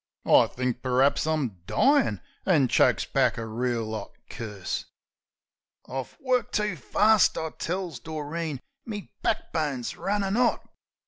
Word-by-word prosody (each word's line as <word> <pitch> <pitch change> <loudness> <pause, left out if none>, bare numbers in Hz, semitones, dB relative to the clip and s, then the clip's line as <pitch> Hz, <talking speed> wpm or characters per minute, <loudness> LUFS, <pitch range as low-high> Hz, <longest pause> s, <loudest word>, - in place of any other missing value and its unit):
I - - +6
thinks 125 -1 -2
per'aps 130 +4 +2
I'm 135 - -1
dyin', 255 - +3 0.2
an' 150 -9 +3
chokes - - +3
back - - +2
a 115 - -3
reel 115 -1 -2
'ot 110 -2 -5 0.2
curse. 105 -5 -4 1.0
"I've 130 0 -5
worked 255 -2 0
too 210 -3 +1
fast," 210 - +3
I 160 -1 -3
tells 175 -5 -4
Doreen. 155 0 -4 0.2
"Me 210 -3 -7
back 225 - -1
bone's 145 -7 -2
runnin' 200 +1 -1
'ot. 245 -1 +2
150 Hz, 130 wpm, -27 LUFS, 125-195 Hz, 1.0 s, I